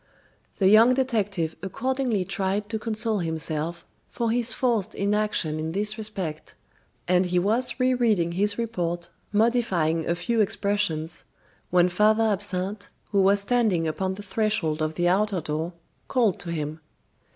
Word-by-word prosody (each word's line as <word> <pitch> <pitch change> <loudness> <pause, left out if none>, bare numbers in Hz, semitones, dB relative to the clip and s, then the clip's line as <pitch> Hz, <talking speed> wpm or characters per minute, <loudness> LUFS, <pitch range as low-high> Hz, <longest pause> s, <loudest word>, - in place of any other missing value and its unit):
The 190 - +3
young 225 +5 +7
detective 205 -11 -1
accordingly 240 0 -1
tried 200 +3 -1
to 220 0 -2
console 220 -1 -1
himself 160 0 -2 0.2
for 235 -2 -1
his 240 0 +1
forced 230 -5 0
inaction 200 -6 0
in 160 +1 -3
this 210 +2 0
respect, 195 -8 -5 0.5
and 180 0 +3
he 180 0 0
was 225 +9 +1
rereading 235 -9 +2
his 205 +4 0
report, 175 -7 -3 0.2
modifying 205 -8 +1
a 170 - +2
few 230 +5 0
expressions, 190 -6 -1 0.5
when 180 0 +4
Father 215 +5 +3
Absinthe, 200 -1 -1 0.2
who 200 -2 +3
was 200 +1 +4
standing 200 -7 +1
upon 185 +5 -2
the 205 - -9
threshold 200 -7 -1
of 155 0 -1
the 175 +1 +1
outer 195 +1 +2
door, 160 +2 -3 0.3
called 230 -7 +1
to 170 - -1
him. 155 -1 -4
200 Hz, 140 wpm, -25 LUFS, 170-220 Hz, 0.5 s, young